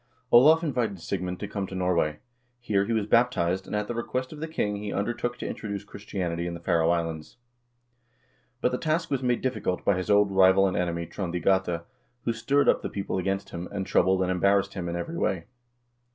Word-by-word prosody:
1 120 - +8
Olav 160 +4 +6
invited 120 - -1
Sigmund 90 +1 -3
to 105 - -4
come 100 -1 -3
to 95 - -8
Norway. 90 -5 +1 0.4
Here 100 -5 +1
he 115 - -3
was 110 -3 +1
baptized, 95 -6 +2
and - - -3
at 105 0 -1
the - - -3
request 130 +3 -3
of 150 - -10
the 160 - -3
king, 105 -10 -1
he 105 0 -5
undertook 120 +4 -2
to - - -5
introduce 100 -2 -5
Christianity 95 -5 -4
in 85 - -4
the - - -7
Faroe 85 -1 +2
Islands. 85 +1 -2 1.2
But 125 - +2
the 125 - -2
task 165 +1 -1
was 135 -2 0
made 125 -2 +1
difficult 125 -8 -2
by 100 - +4
his 95 +2 -3
old 105 -1 +4
rival 95 0 +5
and 95 - 0
enemy 85 -1 -1
Trond 85 +1 -5
i - - +2
Gata, 90 -1 +1 0.4
who 115 - 0
stirred 140 +6 +1
up - - +4
the - - -4
people 100 -1 -3
against 95 +2 -2
him, 85 +1 -5
and 100 -2 -3
troubled 95 +1 +3
and 90 - 0
embarrassed 100 +2 +2
him 90 -3 -4
in 85 - -3
every 165 - -4
way. 85 -3 0
100 Hz, 215 wpm, -27 LUFS, 90-115 Hz, 1.2 s, 1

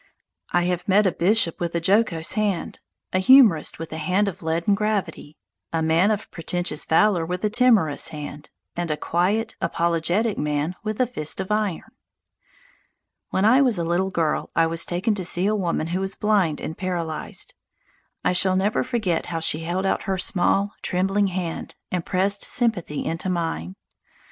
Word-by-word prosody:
I 175 - +2
have 180 +2 -2
met 205 +2 +4
a 190 - +3
bishop 180 0 +1
with 170 -1 -3
a - - +2
jocose 185 -2 +1
hand, 205 -5 -2 0.3
a 185 - +3
humourist 215 - +5
with 165 -1 -7
a 160 - -4
hand 185 +6 +1
of 195 - -5
leaden 165 +4 0
gravity, 200 -7 -2 0.3
a 165 -1 0
man 165 +5 +3
of 215 -1 -2
pretentious 175 -2 -3
valour 175 +1 +3
with 180 +4 -3
a 210 - 0
timorous 220 - +3
hand, 150 -1 -8 0.3
and 175 -1 -3
a 150 - -1
quiet, 185 +8 0
apologetic 170 +6 0
man 150 +3 -1
with 215 -1 -3
a 255 - +4
fist 155 -11 -4
of 190 +1 -4
iron. 210 -5 -1 1.4
When 190 - +1
I 250 +5 +6
was 250 -7 +2
a 170 - -1
little 175 +3 0
girl 165 -4 -1
I 165 - +4
was 165 0 0
taken 185 +6 0
to 200 - -3
see[A] 180 +3 +1
a - - +1
woman 175 -5 -1
who 185 - 0
was 195 0 -3
blind 200 -8 +1
and 160 - -5
paralysed. 170 -4 -4 0.7
I - - +3
shall 185 +1 +3
never 195 +3 +1
forget 215 -9 -1
how 165 -2 -3
she 160 -1 +1
held 175 +4 -2
out - - 0
her 190 - +1
small, 195 +2 +1
trembling 195 +3 +1
hand 180 -3 -4 0.2
and 180 -2 -1
pressed 195 +3 0
sympathy 210 - -1
into 165 +3 -3
mine. 165 - -3
180 Hz, 175 wpm, -23 LUFS, 165-205 Hz, 1.4 s, I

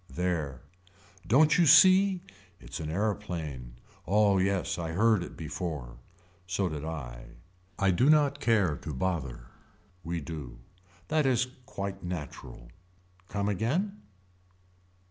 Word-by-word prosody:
There. 80 -7 -2 0.7
Don't 150 +7 +5
you 170 - +5
see. 185 +4 +6 0.4
It's - - -8
an 75 - -4
aeroplane. 80 - -3 0.3
Oh 100 0 +4
yes 95 -1 0
I 80 -1 -3
heard 110 +2 +3
it - - -8
before. 75 -6 -5 0.5
So 95 +1 0
did 75 -2 -5
I. 60 -7 -6 0.5
I 100 -1 +3
do 125 +11 +3
not 145 -2 +4
care 105 - +2
to 75 -3 -6
bother. 65 -7 -3 0.6
We 85 0 -3
do. 75 -6 -7 0.5
That 155 -3 +2
is 125 -1 +2 0.2
quite 100 0 -5
natural. 75 -8 -7 0.6
Come 100 0 -1
again. 150 - -1
90 Hz, 120 wpm, -29 LUFS, 75-115 Hz, 0.7 s, see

